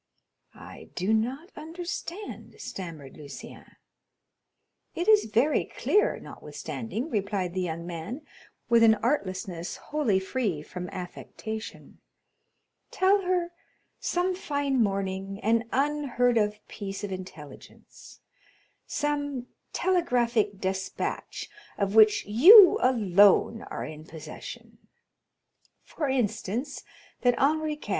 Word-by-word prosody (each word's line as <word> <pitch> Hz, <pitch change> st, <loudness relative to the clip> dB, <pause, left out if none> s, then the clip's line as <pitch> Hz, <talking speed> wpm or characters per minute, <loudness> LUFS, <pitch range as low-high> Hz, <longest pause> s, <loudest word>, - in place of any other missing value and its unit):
"I -, -, -12 dB
do 190 Hz, +5 st, +1 dB
not 260 Hz, -, -1 dB
understand," 340 Hz, +4 st, -7 dB
stammered 160 Hz, -8 st, -8 dB
Lucien. 145 Hz, -2 st, -11 dB, 1.2 s
"It 345 Hz, -, -2 dB
is 430 Hz, -1 st, +6 dB
very 235 Hz, +8 st, +2 dB
clear, 420 Hz, -, +1 dB
notwithstanding," 235 Hz, +6 st, -6 dB
replied 195 Hz, -3 st, -1 dB
the 185 Hz, -, -1 dB
young 170 Hz, -1 st, -3 dB
man, 180 Hz, -, -6 dB, 0.4 s
with 235 Hz, -1 st, +5 dB
an 225 Hz, -1 st, +7 dB
artlessness 190 Hz, -, -2 dB
wholly 275 Hz, -11 st, 0 dB
free 190 Hz, -, -2 dB
from 180 Hz, +2 st, -7 dB
affectation; 215 Hz, +4 st, -7 dB, 0.9 s
"tell 390 Hz, +2 st, +3 dB
her 360 Hz, -2 st, 0 dB, 0.5 s
some 360 Hz, +1 st, 0 dB
fine 285 Hz, -7 st, -1 dB
morning 195 Hz, -1 st, -2 dB
an 230 Hz, +2 st, +1 dB
unheard 265 Hz, -4 st, +1 dB
of 210 Hz, 0 st, -2 dB
piece 195 Hz, -1 st, -6 dB
of 205 Hz, -, -4 dB
intelligence—some 245 Hz, -, -7 dB, 0.3 s
telegraphic 240 Hz, -, +1 dB
despatch, 190 Hz, 0 st, -3 dB, 0.3 s
of 200 Hz, -1 st, 0 dB
which 215 Hz, -1 st, +6 dB
you 355 Hz, -, +9 dB
alone 210 Hz, -2 st, +4 dB
are -, -, -4 dB
in 155 Hz, 0 st, -9 dB
possession; 155 Hz, -1 st, -10 dB, 1.0 s
for 295 Hz, -4 st, -3 dB
instance, 250 Hz, +1 st, -2 dB, 0.4 s
that 245 Hz, -1 st, +3 dB
Henri 310 Hz, +2 st, +2 dB
IV. 295 Hz, -7 st, -10 dB
225 Hz, 100 wpm, -27 LUFS, 190-295 Hz, 1.2 s, you